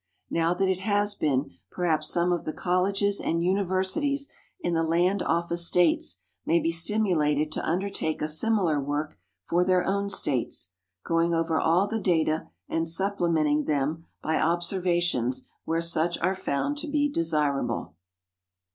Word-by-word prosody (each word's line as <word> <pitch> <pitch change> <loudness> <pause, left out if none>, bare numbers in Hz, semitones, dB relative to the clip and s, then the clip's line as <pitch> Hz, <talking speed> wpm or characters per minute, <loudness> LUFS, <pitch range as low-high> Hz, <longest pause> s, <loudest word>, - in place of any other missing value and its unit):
Now 165 +1 +1
that 190 +2 +1
it 190 -1 0
has 205 +1 +1
been, 145 -7 0 0.2
perhaps 160 -4 0
some 175 +1 +1
of 175 - 0
the 155 - -4
colleges 195 +3 0
and 165 +1 0
universities 190 - 0 0.3
in 175 - -1
the 165 - +2
land 175 +4 +2
office 170 +1 0
States 160 - +2 0.2
may 165 - +2
be 165 - 0
stim 175 +7 +1
ulated 150 -5 +1
to - - -3
undertake 180 -2 -1
a 150 - -1
similar 165 -2 +1
work 145 +2 -3 0.3
for 175 +1 +3
their 185 0 +2
own 200 +1 0
States, 130 - -2 0.3
going 165 0 +2
over 165 -1 +1
all 170 +4 +3
the 220 +2 -2
data 160 -4 +1 0.2
and 165 0 -1
supplementing 165 -4 +1
them 150 +3 -1 0.2
by 160 0 +1
observations 175 - 0 0.2
where 165 +1 0
such 170 0 0
are 185 +3 +1
found 190 - -2
to 315 - -5
be 290 0 +1
desirable. 155 - -1
170 Hz, 150 wpm, -27 LUFS, 155-190 Hz, 0.3 s, for